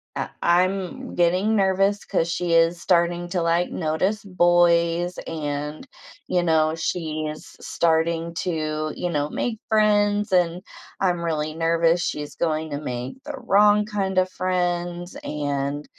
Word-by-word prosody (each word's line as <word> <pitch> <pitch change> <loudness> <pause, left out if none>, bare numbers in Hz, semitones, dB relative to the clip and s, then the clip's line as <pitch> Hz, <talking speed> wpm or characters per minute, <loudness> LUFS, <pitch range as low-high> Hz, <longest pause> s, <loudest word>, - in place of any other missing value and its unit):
I - - -3
I'm 190 +8 0
getting 180 +5 +2
nervous 195 +1 +2
'cause 170 -3 0
she 175 0 -1
is 165 +1 +3
starting 175 0 +1
to, 175 0 -1
like, 170 +1 +1
notice 185 +6 -1
boys 175 -1 +2
and, 150 - -4 0.4
you 180 - +1
know, 160 -2 +2
she’s 155 -2 -4
s - - -10
starting 165 0 +1
to, 155 -2 -2
you 180 - -3
know, 150 -3 -1
make 225 +5 -3
friends 210 -1 +2
and 175 -1 +2 0.4
I'm 180 -3 +1
really 155 -2 -2
nervous 165 +1 +2
she's 150 -1 -5
going 160 -1 -1
to 145 - -3
make 125 - -5
the 295 +1 -6
wrong 210 -3 +4
kinda 190 -3 0
friends 175 -1 -2
and, 145 0 -3
175 Hz, 135 wpm, -23 LUFS, 160-185 Hz, 0.4 s, wrong